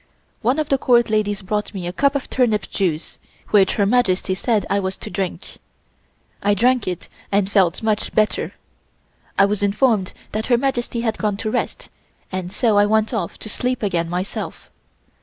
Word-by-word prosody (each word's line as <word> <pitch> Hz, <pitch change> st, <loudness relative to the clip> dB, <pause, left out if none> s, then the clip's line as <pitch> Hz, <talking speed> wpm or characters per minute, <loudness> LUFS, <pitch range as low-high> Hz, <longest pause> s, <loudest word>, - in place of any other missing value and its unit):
One 250 Hz, +5 st, +2 dB
of 310 Hz, -1 st, -1 dB
the 275 Hz, -, +2 dB
Court 240 Hz, -3 st, +3 dB
ladies 205 Hz, -2 st, 0 dB
brought 210 Hz, +2 st, -2 dB
me 185 Hz, -2 st, -4 dB
a 175 Hz, -, -3 dB
cup 280 Hz, +6 st, +2 dB
of 280 Hz, -, -2 dB
turnip 225 Hz, -6 st, +1 dB
juice 170 Hz, -5 st, -2 dB, 0.3 s
which 195 Hz, -3 st, +4 dB
Her 205 Hz, -, +2 dB
Majesty 200 Hz, -4 st, +2 dB
said 215 Hz, +2 st, 0 dB
I 200 Hz, -, +1 dB
was 190 Hz, -1 st, -3 dB
to 215 Hz, -, -8 dB
drink. 195 Hz, -2 st, -4 dB, 0.8 s
I 205 Hz, 0 st, +3 dB
drank 245 Hz, +3 st, +2 dB
it 180 Hz, -2 st, -4 dB, 0.2 s
and 200 Hz, 0 st, +1 dB
felt 190 Hz, -1 st, +2 dB
much 215 Hz, -1 st, 0 dB
better. 215 Hz, 0 st, +1 dB, 0.8 s
I 195 Hz, -, +6 dB
was 205 Hz, 0 st, -1 dB
informed 205 Hz, -1 st, +2 dB, 0.2 s
that 215 Hz, +1 st, -2 dB
Her 240 Hz, -, +4 dB
Majesty 240 Hz, -2 st, -1 dB
had 225 Hz, -2 st, -1 dB
gone 210 Hz, -2 st, 0 dB
to 215 Hz, +1 st, -2 dB
rest, -, -, -3 dB, 0.4 s
and 185 Hz, -1 st, -4 dB
so 210 Hz, 0 st, +3 dB
I 205 Hz, -, +5 dB
went 220 Hz, +2 st, +2 dB
off 200 Hz, -7 st, -2 dB
to -, -, -6 dB
sleep 250 Hz, +3 st, -2 dB
again 170 Hz, -4 st, 0 dB
myself. 180 Hz, +3 st, -4 dB
210 Hz, 180 wpm, -21 LUFS, 195-235 Hz, 0.8 s, I